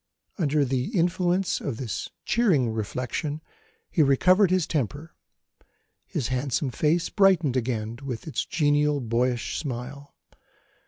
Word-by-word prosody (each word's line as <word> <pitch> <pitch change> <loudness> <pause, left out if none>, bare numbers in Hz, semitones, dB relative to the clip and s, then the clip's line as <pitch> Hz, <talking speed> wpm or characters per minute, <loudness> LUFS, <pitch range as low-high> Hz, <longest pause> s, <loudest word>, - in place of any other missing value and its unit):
Under 150 -3 +2
the 130 -1 -1
influence 180 +2 +1
of 130 -6 -3
this 115 -6 -4 0.2
cheering 170 - +2
reflection, 125 +7 -3 0.5
he 165 - +2
recovered 180 +8 +4
his 185 -3 +2
temper; 150 +1 -3 0.9
his 120 - -3
handsome 130 +1 -1
face 160 +7 +1
brightened 180 -9 +3
again 115 -2 -2
with 125 -5 -5
its 155 - -1
genial 150 -2 +2
boyish 120 0 -1
smile. 140 0 -6
145 Hz, 115 wpm, -26 LUFS, 125-165 Hz, 0.9 s, recovered